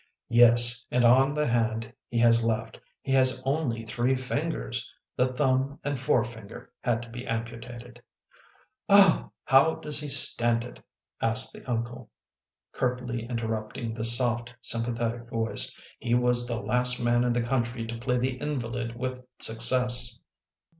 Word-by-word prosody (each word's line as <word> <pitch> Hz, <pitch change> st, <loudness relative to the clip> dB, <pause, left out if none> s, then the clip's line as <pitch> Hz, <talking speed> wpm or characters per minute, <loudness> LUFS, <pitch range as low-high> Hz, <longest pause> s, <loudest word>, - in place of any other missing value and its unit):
" -, -, -60 dB
Yes, 120 Hz, 0 st, +5 dB
and 125 Hz, 0 st, +1 dB
on 135 Hz, +4 st, +4 dB
the 150 Hz, 0 st, 0 dB
hand 115 Hz, -1 st, -1 dB, 0.2 s
he 120 Hz, -, -4 dB
has 115 Hz, 0 st, +4 dB
left 110 Hz, -1 st, -3 dB, 0.2 s
he 135 Hz, -, -4 dB
has 130 Hz, -1 st, +3 dB
only 135 Hz, -6 st, -2 dB
three 120 Hz, +4 st, 0 dB
fingers. 130 Hz, -2 st, -3 dB, 0.2 s
The 125 Hz, 0 st, +1 dB
thumb 135 Hz, +1 st, 0 dB
and 145 Hz, -2 st, -3 dB
forefinger 115 Hz, -5 st, -3 dB
had 120 Hz, -1 st, -1 dB
to 115 Hz, -, -13 dB
be 120 Hz, +1 st, -8 dB
ampu 115 Hz, -1 st, -5 dB
tated." 120 Hz, -1 st, -12 dB, 0.9 s
"Oh!"... 200 Hz, -3 st, +5 dB
" -, -, -66 dB
How 140 Hz, +5 st, +5 dB
does 150 Hz, -1 st, -1 dB
he 150 Hz, -, -5 dB
stand 120 Hz, -4 st, +4 dB
it? 120 Hz, -, -12 dB, 0.2 s
" -, -, -35 dB
asked 115 Hz, +3 st, +1 dB
the -, -, -13 dB
uncle, 120 Hz, +1 st, -4 dB, 0.6 s
curtly 125 Hz, -2 st, -3 dB
interrupting 115 Hz, -1 st, -4 dB
the 110 Hz, 0 st, -5 dB
soft, 120 Hz, 0 st, +2 dB
sympathetic 115 Hz, 0 st, -2 dB
voice. 115 Hz, -1 st, -3 dB, 0.2 s
" -, -, -26 dB
He 120 Hz, -, 0 dB
was 125 Hz, 0 st, +2 dB
the 120 Hz, -1 st, -3 dB
last 125 Hz, +1 st, +3 dB
man 120 Hz, 0 st, +1 dB
in 125 Hz, -, 0 dB
the 120 Hz, 0 st, -1 dB
country 120 Hz, -1 st, -2 dB
to 115 Hz, 0 st, -7 dB
play 125 Hz, +1 st, -1 dB
the 125 Hz, +1 st, -2 dB
invalid 120 Hz, -5 st, -4 dB
with 130 Hz, +1 st, -5 dB, 0.2 s
success." 120 Hz, +1 st, +3 dB
120 Hz, 160 wpm, -26 LUFS, 115-130 Hz, 0.9 s, Yes